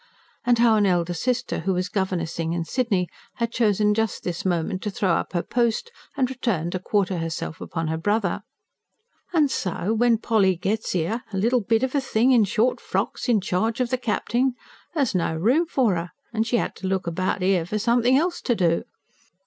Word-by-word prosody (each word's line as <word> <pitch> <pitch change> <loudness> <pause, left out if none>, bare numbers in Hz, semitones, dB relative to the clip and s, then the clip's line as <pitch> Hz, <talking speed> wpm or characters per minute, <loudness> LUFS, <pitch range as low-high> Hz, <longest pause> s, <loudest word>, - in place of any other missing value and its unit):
And 245 -1 +3
how 230 -2 +5
an 205 -1 +3
elder 175 -1 +1
sister, 245 +7 -1
who 190 -1 0
was 180 +1 -1
governessing 170 -4 -2
in 170 -1 -2
Sydney, 205 -6 0 0.3
had 235 -1 -2
chosen 210 -3 +2
just 220 -1 -1
this 175 -2 -3
moment 185 +1 -1
to 210 - -2
throw 195 -2 0
up 170 - -1
her 175 - 0
post 240 - 0 0.3
and 260 -2 +2
return 230 -10 -2
to 185 - -2
quarter 190 -1 0
herself 165 0 -4
upon 165 -1 -3
the 160 +1 -2
brother. 205 +1 0 0.9
"An' 310 -4 +4
so 190 -2 -1
when 235 0 +3
Polly 210 -5 +2
gets 195 +4 -2
'ere 185 +9 -1
a 195 - -3
little 235 +5 +2
bit 225 +3 +1
of 260 - -1
a 285 - +2
thing 255 -1 +2
in 235 -4 +5
short 225 +5 +1
frocks, - - -2
in 220 -4 +4
charge 220 +5 -1
of 250 -1 0
the 255 - +2
capt'n 245 +2 0 0.4
there 295 - +3
was 255 - -1
no 170 -3 0
room 250 - +2
for 245 - +2
'er, 170 +1 -3 0.2
an' 220 - 0
she 235 +1 +1
'ad - - -2
to 190 - -4
look 190 -1 -1
about 185 +3 -1
'er 185 -2 +3
for 210 - -2
somethin' 240 +3 +3
else 345 +4 0
to 240 - +1
do. 170 -4 +2
210 Hz, 205 wpm, -24 LUFS, 180-240 Hz, 0.9 s, how